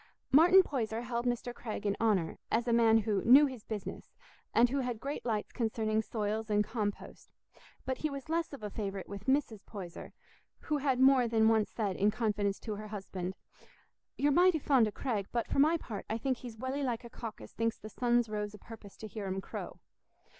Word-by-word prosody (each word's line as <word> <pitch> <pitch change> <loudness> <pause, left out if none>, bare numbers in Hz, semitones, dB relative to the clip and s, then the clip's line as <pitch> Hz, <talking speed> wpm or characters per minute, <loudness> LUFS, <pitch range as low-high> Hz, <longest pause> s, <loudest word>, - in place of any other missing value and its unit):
Martin 355 +7 +8
Poyser 230 -7 -2
held 240 0 -2
Mr. 245 0 -2
Craig 220 -3 -6
in 200 -1 +1
honour, 200 -8 +1
as 235 +2 0
a 235 - +2
man 225 -1 +5
who 210 -3 0
"knew 270 +5 +8
his 260 -6 -6
business" 210 -3 -7 0.4
and 235 +2 +5
who 280 - 0
had 245 -4 -2
great 280 +5 -4
lights 215 -3 -1
concerning 220 -2 0
soils 220 0 -3
and 210 0 +3
compost; 210 -1 -4 0.6
but 260 -1 -2
he 310 - -1
was 275 0 -7
less 330 +1 -1
of 280 -6 -9
a 210 - -4
favourite 195 -3 -4
with 200 0 -8
Mrs. 265 -6 0
Poyser, 185 -5 -8 0.5
who 300 - -1
had 265 -3 +1
more 260 -2 +6
than 220 -1 +3
once 220 -2 +2
said 205 -5 -2
in 205 +2 +3
confidence 210 -2 -1
to 220 - -4
her 215 +1 -7
husband, 190 -3 -5 0.8
"You're 290 +1 +3
mighty 355 +3 +5
fond 265 -6 +3
o' - - -3
Craig, 210 -5 -2
but 235 -1 0
for - - -1
my 315 +4 +5
part, 215 -10 -7
I 220 - 0
think 260 +2 -1
he's 235 -3 -9
welly 260 +4 -3
like 250 -3 -2
a 235 - -9
cock 230 -3 -7
as 105 - -12
thinks 230 0 -1
the 215 - -9
sun's 240 +1 +1
rose 210 -1 -4
o' - - -10
purpose 215 -2 -12
to 220 - -7
hear 210 -1 -6
him 190 0 -2
crow." - - -7
225 Hz, 210 wpm, -32 LUFS, 210-260 Hz, 0.8 s, Martin